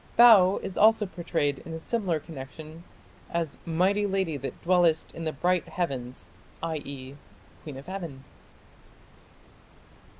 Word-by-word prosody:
Bau 210 -6 +8
is 185 - -4
also 220 0 +6
prayed 165 -6 -1
in 165 - -9
a 160 - -5
similar 185 -3 -1
connection 155 +2 -10 0.5
as 165 -4 -2
"mighty 190 +5 +2
lady 190 -5 0
that 135 -1 -6
dwellest 175 -3 +3
in 165 - -6
the 155 - 0
bright 180 +4 0
heavens", 130 -8 -4 0.4
i.e. 140 -4 -5 0.5
"Queen 145 -4 -8
of 135 - -10
heaven". 170 -8 -6
165 Hz, 125 wpm, -27 LUFS, 145-185 Hz, 0.5 s, Bau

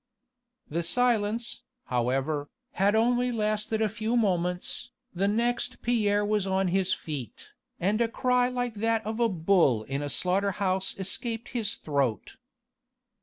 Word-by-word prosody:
The 165 +3 -2
silence, 230 +3 +1 0.2
however, 135 +4 -1 0.2
had 200 +3 +2
only 245 +2 +2
lasted 215 0 0
a - - +3
few 220 +3 -1
moments, 180 -4 0 0.2
the 190 +2 +1
next 235 +4 -1
Pierre 210 -3 +2
was 210 -2 0
on 190 -1 +1
his 190 +1 +1
feet, 140 -7 -5 0.3
and 205 +6 +1
a 235 - +3
cry 250 +1 +1
like 245 -1 -2
that 225 +1 0
of 220 +2 -3
a 235 -1 +3
bull 165 - +3
in 135 +5 -3
a 145 - -3
slaughter 190 +6 +1
house 190 -1 0
escaped 225 +4 -2
his 225 -4 -1
throat. 135 - -2
205 Hz, 140 wpm, -28 LUFS, 175-230 Hz, 0.3 s, a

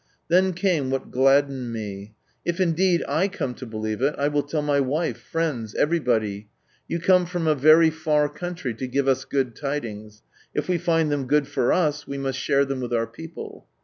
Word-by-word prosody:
Then 185 +2 +4
came 170 -7 0
what 135 0 -3
gladdened 135 -1 +2
me: 105 -2 -6
" - - -42
If, 170 +2 -2
indeed, 180 0 +2
I 185 +5 +1
come 160 -10 -4
to 130 +1 -9
believe 110 0 -4
it, 140 +3 +2
I 145 +1 +1
will 145 0 +1
tell 145 +1 -3
my 145 -1 +2
wife, 145 +5 -1
friends, 145 -10 -3
everybody. 110 -10 0 0.4
You 170 - -2
come 180 +1 +4
from 175 -1 -3
a 155 - +4
very 155 +3 +6
far 155 -2 +1
country 165 -3 -5
to 130 +4 -5
give 135 +2 0
us 130 0 +2
good 130 -4 -1
tidings. 110 -7 -5 0.3
If - - -1
we 180 -2 +1
find 165 -3 +1
them 140 -3 -1
good 145 +1 +2
for 130 -3 +1
us, 150 -4 +1
we 140 - -4
must 135 -1 -2
share 140 0 +2
them 135 -1 -3
with 120 -1 -4
our 115 -1 +1
people." 160 +9 -10
145 Hz, 200 wpm, -24 LUFS, 125-165 Hz, 0.4 s, very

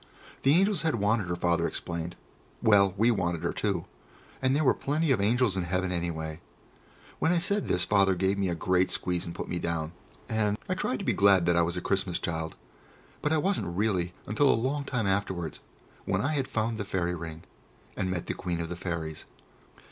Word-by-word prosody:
The 140 +3 +5
angels 195 0 +3
had 160 -4 +1
wanted 105 -2 +1
her, 85 - -1
Father 85 -1 +1
explained; 85 0 -4 0.4
well, 100 -3 +4
we 115 +4 +4
wanted 85 -6 -1
her 85 - 0
too, - - -1 0.6
and 130 +1 +2
there 155 - +2
were 130 - +5
plenty 150 +2 0
of 115 -7 +3
angels 115 0 +3
in 90 -2 -1
heaven, 90 +1 -1
anyway. 80 -2 -3 0.8
When 160 - +3
I 180 - +3
said 200 +4 0
this 90 - +2
Father 100 -2 +4
gave 95 +2 +1
me 95 -2 +1
a 85 - -1
great 90 +2 +2
squeeze 90 -1 -2
and 85 - -6
put - - -5
me 90 - -2
down, 80 -2 -2 0.4
and 105 -2 0
I - - 0
tried 155 -8 -1
to - - -6
be 120 - +2
glad 100 -2 +5
that 85 0 +3
I 85 - +4
was 85 +1 -1
a - - -2
Christmas 95 -2 0
child. 80 -1 -3 0.7
But 150 - 0
I 160 - +3
wasn't 155 - 0
really 95 -5 0
until 135 +7 +3
a - - +5
long 135 +5 -1
time 125 -6 -1
afterwards, 95 -5 -1 0.5
when - - +1
I 150 +4 0
had 135 -3 0
found 110 0 -1
the - - -1
Fairy 90 -3 -1
Ring, 80 -1 -7 0.5
and 95 - -1
met 90 -2 -2
the - - -2
Queen 90 -2 -3
of 85 0 -3
the 90 - -4
Fairies. 85 -3 -4
95 Hz, 210 wpm, -28 LUFS, 85-120 Hz, 0.8 s, The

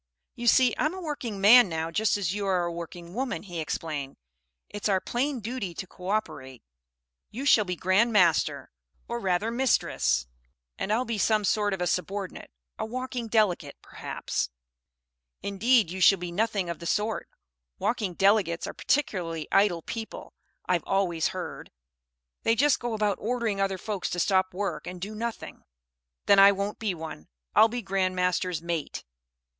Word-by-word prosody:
"You 240 - -5
see 250 +1 +5
I'm 310 +4 +1
a - - -6
working 285 - -4
man 215 +2 +8
now 160 0 -3
just 210 +4 +1
as 190 -3 -1
you 205 -1 -2
are 185 -2 +2
a 170 - -2
working 170 +1 -8
woman," 255 +3 -3
he 175 -4 -6
explained. 150 -3 -4 0.5
"It's 205 0 -3
our 190 -2 +3
plain 255 +5 -2
duty 215 -6 -4
to 190 - -5
co 180 0 -9
operate. 130 - -3 0.7
You 260 +6 -6
shall 220 -7 +5
be 180 -1 -3
Grand 190 +7 +2
Master 180 -7 +2 0.4
or 235 0 -3
rather 195 +2 0
Mistress 60 - +1 0.5
and 205 - -3
I'll 235 +4 +1
be 230 -3 -3
some 215 +1 +2
sort 205 +1 +1
of 190 -2 -3
a - - +1
subordinate, 190 +2 -3 0.3
a - - -1
Walking 255 0 -4
Delegate, 200 -10 +1
perhaps." - - -4 0.9
"Indeed, 215 -1 +2
you 190 +1 -5
shall 195 - +7
be 175 -1 -5
nothing 205 -1 0
of 170 -1 -5
the 170 - -6
sort. 215 +3 -1 0.5
Walking 210 -6 -1
Delegates 195 -3 +2
are - - -5
particularly 175 - -1
idle 190 -5 +3
people, 225 -1 -7 0.3
I've 180 -3 +1
always 180 -4 +1
heard. - - -6 0.7
They 225 - +2
just 290 +3 +3
go 240 -2 -3
about 210 -2 0
ordering 225 -3 -1
other 195 -1 0
folks 200 0 -3
to 175 - -3
stop 185 +1 +2
work 200 +2 -4
and 180 0 -6
do 200 +4 -5
nothing." 230 +1 -6 0.6
"Then 200 -1 +6
I 200 +1 +9
won't 200 +1 -3
be 210 -5 -1
one. 160 - -8 0.3
I'll 220 - +7
be 240 +1 -4
Grand 190 -1 0
Master's 180 -2 0
Mate." 170 -3 -3
195 Hz, 170 wpm, -27 LUFS, 175-225 Hz, 0.9 s, I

